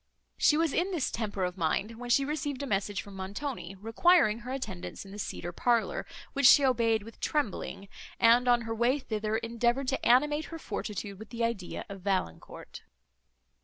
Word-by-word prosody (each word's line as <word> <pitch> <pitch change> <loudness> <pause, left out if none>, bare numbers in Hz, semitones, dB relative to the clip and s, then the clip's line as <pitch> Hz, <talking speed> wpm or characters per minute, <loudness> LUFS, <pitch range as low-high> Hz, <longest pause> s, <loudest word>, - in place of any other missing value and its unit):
She 300 - +4
was 325 -2 +1
in 360 +3 +1
this 335 -9 -1
temper 205 -4 -3
of 180 +1 -3
mind, 205 +8 -1
when 245 0 -6
she 275 +3 +4
received 290 -2 -3
a - - -2
message 200 -4 -1
from 200 -1 -12
Montoni, 195 0 -5
requiring 225 - +3
her 245 +2 -7
attendance 215 -9 -5
in 195 - -11
the 205 - -8
cedar 175 -3 -4
parlour, 230 +1 0 0.3
which 280 -3 +5
she 280 +2 +8
obeyed 230 -4 +2
with 225 +2 -13
trembling, 220 -7 -2 0.3
and, 240 +2 +5
on 240 -1 +4
her 225 0 -4
way 240 +5 +2
thither, 215 -4 -2
endeavoured 235 +3 0
to 270 - -2
animate 295 +5 +3
her 330 - -7
fortitude 205 - -5
with 220 -1 -10
the 235 +1 -3
idea 230 -6 -3
of 195 -2 -9
Valancourt. 185 - -3
230 Hz, 180 wpm, -29 LUFS, 200-270 Hz, 0.3 s, she